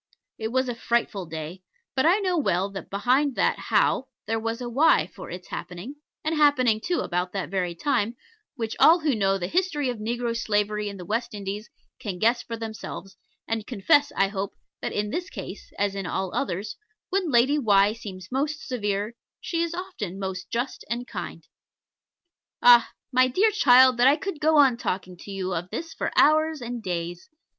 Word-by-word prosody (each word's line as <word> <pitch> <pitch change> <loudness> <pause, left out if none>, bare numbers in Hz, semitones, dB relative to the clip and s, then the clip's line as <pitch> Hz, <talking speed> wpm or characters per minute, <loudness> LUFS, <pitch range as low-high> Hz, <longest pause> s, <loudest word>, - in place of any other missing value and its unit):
It 220 - -2
was 260 +3 0
a 245 - -1
frightful 230 -5 -1
day, 160 +3 -6 0.3
but 265 +3 +3
I 360 +4 +5
know 375 -4 0
well 195 - +1
that 195 - -8
behind 255 +7 +2
that - - +1
How 265 - +2 0.2
there 225 +1 -1
was 225 +1 -3
a 245 - -4
Why 260 - +4
for - - -11
its 180 +1 -8
happening, 180 +11 -7 0.3
and 315 - 0
happening 255 -7 +4
too, 355 - 0
about 180 +1 -2
that 195 -2 -3
very 180 -3 -1
time, 235 - 0 0.4
which 225 -4 -3
all 335 +2 +7
who 300 -3 +2
know 195 -3 +2
the 180 - -3
history 300 - 0
of 240 -3 -4
negro 235 +2 -2
slavery 210 -1 0
in 200 - -8
the 180 - -8
West 230 +4 -2
Indies 205 +2 -5 0.3
can 195 -4 -4
guess 230 +5 +2
for 230 - -6
themselves, 220 -3 -7 0.3
and 225 -2 -2
confess, 285 +6 +3
I 195 - +3
hope, 195 -1 -4 0.3
that - - -2
in 210 0 -2
this 355 +2 -3
case, - - -8
as 200 -1 0
in 195 -2 -4
all 190 +2 -2
others, 200 -5 -3 0.3
when 375 -3 +1
Lady 265 +3 +4
Why 205 -4 +4
seems 185 -5 -9
most 290 +4 -2
severe 210 -3 -2 0.3
she 335 -1 -2
is 335 0 -1
often 345 - -5
most 190 -2 -5
just 245 +3 -3
and 240 +1 -2
kind. - - -7 1.2
Ah! 240 -1 +8 0.2
my 255 0 +5
dear 390 - +3
child, 255 - +6
that 245 +2 +5
I 280 - +6
could 385 -2 -5
go 310 0 +3
on 270 -5 +6
talking 185 -5 -3
to 185 - -12
you 190 -1 -3
of 175 +1 -3
this 330 - -5
for - - -3
hours 310 +1 +4
and 240 -1 -5
days! 175 -2 -4
230 Hz, 190 wpm, -25 LUFS, 195-275 Hz, 1.2 s, Ah